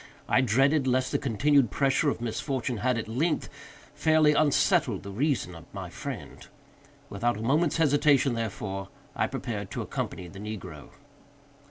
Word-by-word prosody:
I - - +4
dreaded 135 +4 +3
lest 130 0 +1
the - - +1
continued 140 +1 +3
pressure 140 +4 +2
of 125 - -3
misfortune 120 +1 -2
had, 125 +2 +1
at 115 - -4
length, 145 +9 -1 0.4
fairly 155 -1 +4
unsettled 150 -1 +2
the 100 - -7
reason 125 - -1
of 85 -2 -13
my - - -6
friend. - - -7 0.7
Without 115 +3 -1
a - - -6
moment's 150 +7 +2
hesitation, 145 -4 +3
therefore, 100 -4 -4 0.3
I - - +1
prepared 100 -4 -5
to - - -4
accompany 90 - -4
the 95 +3 -11
negro. 95 -8 -7
125 Hz, 150 wpm, -27 LUFS, 105-145 Hz, 0.7 s, I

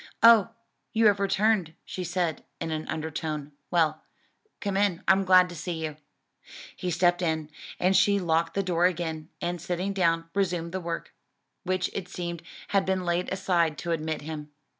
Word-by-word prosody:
"Oh, 230 -2 +8 0.4
you 225 0 +3
have 205 -1 +5
returned," 200 -4 +2
she 185 - -5
said 175 -3 -1 0.2
in 165 - -3
an 155 0 -3
undertone; 155 -2 -4 0.2
"well, 160 -3 +2 0.6
come 200 -1 -2
in. 195 -4 +1
I'm 190 +2 +5
glad 185 -1 +7
to 175 - -8
see 170 +2 -4
you." 155 -1 -5 0.8
He 180 - -3
stepped 175 +1 +2
in, 160 -3 -1 0.3
and 185 +2 +3
she 200 +1 +5
locked 165 -2 +1
the 195 - +1
door 175 -1 +3
again, 160 -3 -4
and 175 -1 -2
sitting 180 +3 -2
down, 165 -3 +1
resumed 175 -4 0
the 190 +1 -3
work, 170 -1 -5 0.5
which 185 -1 0
it 190 -2 -4
seemed 170 -2 -5 0.3
had 195 -1 +3
been 190 -1 -1
laid 175 +1 0
aside 175 -5 +1
to 170 - -3
admit 155 -1 -2
him. 150 -1 -6
175 Hz, 170 wpm, -27 LUFS, 160-190 Hz, 0.8 s, Oh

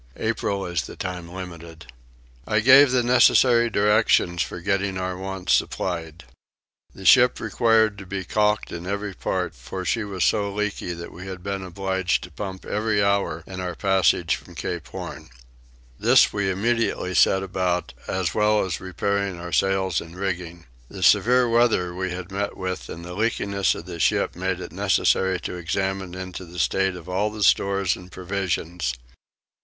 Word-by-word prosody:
April 100 -3 -1
is 85 -8 -2
the - - -10
time 90 -2 -5
limited. 85 -3 -9 0.6
I 105 - +2
gave 135 +4 +8
the 125 -1 +2
necessary 120 -1 +5
directions 105 -4 +3
for 85 - -3
getting 100 +1 -1
our 95 0 -3
wants 95 -1 -2
supplied. 85 -2 -2 0.7
The - - -11
ship - - +6
required 110 -3 +2
to 95 - -10
be 95 +1 -4
caulked 105 +3 0
in 85 +1 -6
every 100 0 -3
part - - -2
for 90 +10 -7
she 115 +3 0
was 95 -3 -2
become 110 - +3
so 100 0 -3
leaky 105 -3 -2
that 85 0 -8
we 95 +2 -10
had 95 -2 -7
been 100 0 -3
obliged 95 0 -1
to - - -10
pump 95 -2 -7
every 105 -1 0
hour 100 -5 0
in 95 -1 -8
our 90 -1 -4
passage 95 -3 +2
from 90 - -15
Cape 80 -1 -4
Horn. 60 - -8 0.7
This - - +5
we 100 -2 0
immediately 105 -1 0
set 95 +1 +4
about, 90 -7 -1
as 95 -4 -1
well 105 -1 +2
as 85 -5 -4
repairing 100 +1 -2
our 85 0 -7
sails 95 -3 +1
and 85 +1 -11
rigging. 90 -3 -4 0.2
The - - -6
severe 125 +1 +5
weather 115 -7 +2
we 95 +1 -3
had 90 +1 -6
met 100 +1 -3
with 95 -1 -4
and 85 +1 -8
the 90 - -7
leakiness 100 -2 0
of - - -8
the - - -7
ship - - +1
made 95 0 -2
it - - -7
necessary 95 -1 +1
to 90 - -5
examine 95 +1 -2
into 95 0 -7
the 90 0 -12
state 95 +3 +1
of 90 -1 -10
all 95 +4 0
the 105 -1 -4
stores 100 -2 +2
and 90 0 -13
provisions. 90 -6 -3
95 Hz, 170 wpm, -24 LUFS, 90-100 Hz, 0.7 s, gave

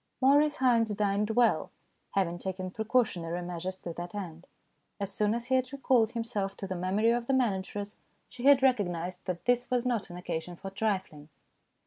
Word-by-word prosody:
Maurice 290 +3 +4
Haynes 235 -4 +3
dined 205 +1 +1
well, 235 +1 +3 0.5
having 175 -3 +1
taken 185 0 -4
pre 220 +3 -4
cautionary 180 -8 0
measures 180 +1 -4
to 170 - -5
that 175 +3 -7
end. 170 -4 -6 0.5
As 200 -1 -3
soon 210 +1 +1
as 235 0 -4
he 260 - -1
had 255 0 +2
recalled 255 -5 +2
himself 220 -4 -3
to - - -5
the 190 - -3
memory 190 +5 +1
of 235 0 -1
the 270 - +2
manageress, 205 -4 -1 0.3
she 250 +1 -8
had 275 -1 +7
recognized 180 -8 +1
that 180 -2 -3
this 245 0 +2
was 250 -1 +1
not 240 -6 -1
an 175 - -8
occasion 175 0 -4
for 195 +3 -8
trifling. 190 -8 -2
205 Hz, 180 wpm, -30 LUFS, 180-245 Hz, 0.5 s, had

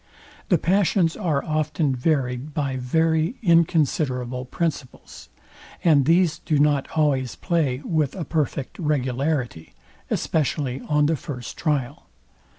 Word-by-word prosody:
The 180 - +5
passions 180 0 +2
are 160 -9 -1
often 155 -2 0
varyed 130 0 -1
by 140 -3 -1
very 160 - +1
inconsiderable 150 - +1
principles; 150 -1 -5 0.5
and 150 -6 +4
these 170 +1 +3
do 155 - 0
not 145 -1 +2
always 135 -5 +1
play 150 -7 -1
with 155 -5 0
a 175 -4 -4
perfect 150 -4 -2
regularity, 135 - -2 0.3
especially 140 -4 -1
on 150 -1 +3
the 160 +2 +2
first 130 -5 -7
trial. 145 -4 -2
150 Hz, 115 wpm, -23 LUFS, 130-160 Hz, 0.5 s, The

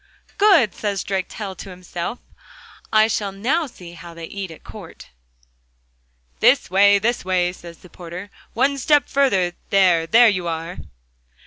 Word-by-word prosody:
'Good!' 365 - +5
says 200 -3 -3
Drakestail 195 +1 -4
to - - -9
himself, 180 +4 -6 0.7
'I 215 0 +5
shall 205 -3 -2
now 265 - -1
see 180 -8 -13
how 170 0 -11
they 165 0 -7
eat 195 +2 -6
at 160 - -13
court.' - - -12 1.3
'This - - +3
way, 200 +2 +5
this 235 +4 -1
way,' 180 -1 0
says 170 -2 -12
the - - -16
porter. 180 +3 -9 0.2
'One 275 +4 +1
step 295 +2 +3
further.... 195 -11 +1 0.2
There, 180 -4 +3
there 235 +6 +6
you 185 -5 0
are. 165 +2 -5
195 Hz, 145 wpm, -21 LUFS, 175-225 Hz, 1.3 s, there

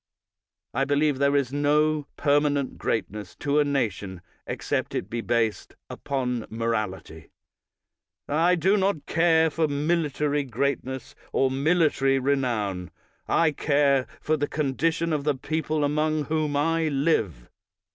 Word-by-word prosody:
I 135 - +1
believe 145 0 +1
there 140 0 +3
is 135 -2 0
no 150 +1 +2
permanent 145 -1 +1
greatness 105 -2 -3
to 145 +1 0
a - - +5
nation 105 -10 -2 0.3
except - - -2
it 95 - -4
be 120 0 -2
based 115 -2 -1 0.2
upon 125 -4 -3
moralit>^ 110 -8 -4 1.0
I 165 +5 +3
do 190 +4 +2
not 190 -7 0
care 160 -1 +3
for 160 +1 +1
military 150 -1 0
greatness 130 +1 -3 0.2
or 135 -1 +2
military 140 -2 +2
renown. 120 -10 -1 0.4
I 165 -2 +3
care 140 -3 +2
for 155 - 0
the 145 0 -1
condition 160 +3 0
of 150 -2 -1
the 150 -1 +1
people 155 +2 -2
among 155 +1 +1
whom 155 -1 -1
I 165 +2 +1
live. 135 - 0
145 Hz, 125 wpm, -25 LUFS, 130-155 Hz, 1.0 s, a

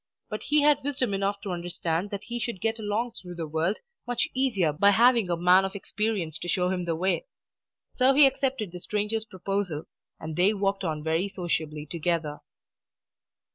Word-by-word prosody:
But 215 - -4
he 295 0 +3
had 290 -1 +4
wisdom 260 -6 -1
enough 200 +1 -1
to 200 - -4
understand 175 +1 -2
that 200 -1 -5
he 240 0 -4
should 235 -4 -3
get 225 +2 -1
along 220 +3 -1
through 180 -4 -8
the 165 -1 -4
world 160 +6 0 0.3
much 245 +4 +1
easier 230 - +1
by 200 +7 +4
having 230 -1 +4
a 170 - +1
man 180 +2 +5
of 195 +1 -3
experience 200 -5 -2
to - - -6
show 180 0 +1
him 180 -1 -2
the 165 -1 -1
way. 190 - 0 0.7
So 265 +1 +5
he 290 0 +9
accepted 265 -7 0
the 180 - -7
stranger's 210 +3 -2
proposal, 190 -5 -3 0.4
and 160 0 -6
they 190 +5 +3
walked 195 0 0
on 155 -3 -2
very 165 +5 0
sociably 160 -5 -3
together. 155 -2 -2
195 Hz, 180 wpm, -27 LUFS, 170-225 Hz, 0.7 s, he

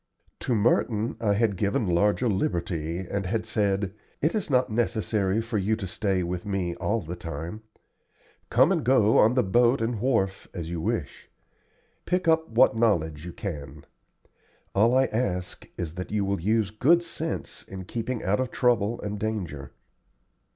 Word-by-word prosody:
To 125 - 0
Merton 110 0 +1
I 105 -3 +2
had 110 -1 +2
given 100 +3 0
larger 100 +7 +2
liberty, 85 -3 -1
and 100 0 -2
had 110 +2 -1
said: 100 -3 0 0.3
"It 155 +4 +1
is 210 -6 -2
not 125 -4 +2
necessary 110 -2 0
for 115 -2 -2
you 105 +3 +1
to 105 -3 -5
stay 95 0 -1
with 90 0 -3
me 95 -4 -2
all 115 +1 0
the 85 +1 -6
time. 85 +4 -6 0.9
Come 130 +8 +5
and 170 -6 +1
go 115 -4 +4
on 115 +3 +5
the 125 - +3
boat 120 +6 +3
and 115 0 -1
wharf 105 -7 0
as 85 -2 -5
you 85 -2 -3
wish. - - -3 0.8
Pick 180 0 0
up 160 0 +3
what 115 0 +4
knowledge 85 -8 +1
you - - -5
can. 75 -7 -7 0.9
All 115 +6 +4
I 135 - +5
ask 90 -7 -3
is 80 -2 -4
that 90 +1 -6
you 105 -2 0
will 100 -3 -1
use 105 +1 +1
good 160 +11 +4
sense 165 -1 -5
in 95 -1 -9
keeping 115 +4 -3
out 100 +4 +1
of 130 -1 -1
trouble 120 -3 +1
and 105 0 -4
danger." 90 -11 -4
105 Hz, 165 wpm, -26 LUFS, 90-120 Hz, 0.9 s, Come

